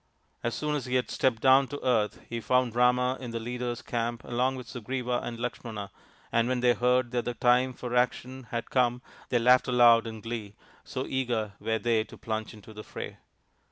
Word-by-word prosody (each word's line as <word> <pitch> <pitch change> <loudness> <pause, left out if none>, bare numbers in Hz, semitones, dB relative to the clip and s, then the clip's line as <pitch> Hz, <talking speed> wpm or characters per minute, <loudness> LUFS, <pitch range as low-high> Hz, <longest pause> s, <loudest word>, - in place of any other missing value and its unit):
As 120 -1 -2
soon 150 0 -1
as 135 -4 -3
he 125 - -1
had 125 -3 0
stepped 120 -4 +1
down 135 +1 +6
to 145 0 -7
earth 110 -5 +1
he 115 0 -4
found 125 -1 +1
Rama 125 +1 +3
in 125 - -6
the 115 0 -3
leader's 120 +1 -4
camp 120 0 -2
along 125 +2 0
with 125 -1 -8
Sugriva 125 0 -2
and 115 -1 -6
Lakshmana, 115 -4 -5 0.4
and 115 0 +2
when 125 -1 0
they 125 -1 +5
heard 125 0 +2
that 120 -2 -1
the 120 - -3
time 125 +2 +3
for 125 0 -5
action 125 +1 0
had 115 -1 -4
come 125 -1 +2 0.3
they 125 - +2
laughed 125 +2 +5
aloud 120 -2 +6
in 110 -1 -6
glee,, 110 -2 -6 0.3
so 130 0 -4
eager 120 -6 -1
were 110 +1 0
they 110 0 +1
to - - -13
plunge 110 -1 -4
into 110 +1 -13
the 105 0 -8
fray. - - -7
120 Hz, 200 wpm, -28 LUFS, 115-125 Hz, 0.4 s, down